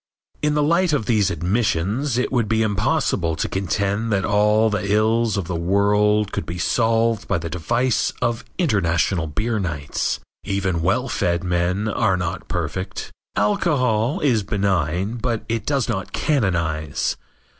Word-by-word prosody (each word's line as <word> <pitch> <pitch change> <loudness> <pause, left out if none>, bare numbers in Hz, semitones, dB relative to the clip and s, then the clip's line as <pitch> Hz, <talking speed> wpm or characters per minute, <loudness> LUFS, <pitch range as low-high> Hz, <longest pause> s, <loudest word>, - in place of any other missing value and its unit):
In 150 0 +1
the 150 - +2
light 170 +2 +2
of 140 -7 0
these 105 -4 +2
admissions 100 - 0
it 125 - 0
would 120 -5 +1
be 110 0 +2
impossible 105 - 0
to - - -1
contend 100 +3 -1
that 95 -2 +1
all 105 +2 +3
the 100 -1 -1
ills 110 +1 +2
of 100 - -2
the 90 - -4
world 105 +4 +2
could - - -4
be 85 - -4
solved 115 +2 +1
by 100 - +1
the 85 0 -5
device 120 +8 0
of 120 -1 -1
international 95 - +1
beer 110 +8 -1
nights. 75 -6 -2 0.2
Even 95 -4 -1
well 110 +10 +1
fed 85 -6 0
men 90 +3 0
are 105 -3 +1
not 90 +1 -4
perfect. 90 +3 -4 0.2
Alcohol 115 +2 +1
is 125 -7 +3
benign, 95 +1 -1
but 120 -2 -2
it 115 -1 -3
does 140 -4 +1
not 95 -6 -3
canonize. 85 - 0
105 Hz, 150 wpm, -22 LUFS, 90-115 Hz, 0.2 s, all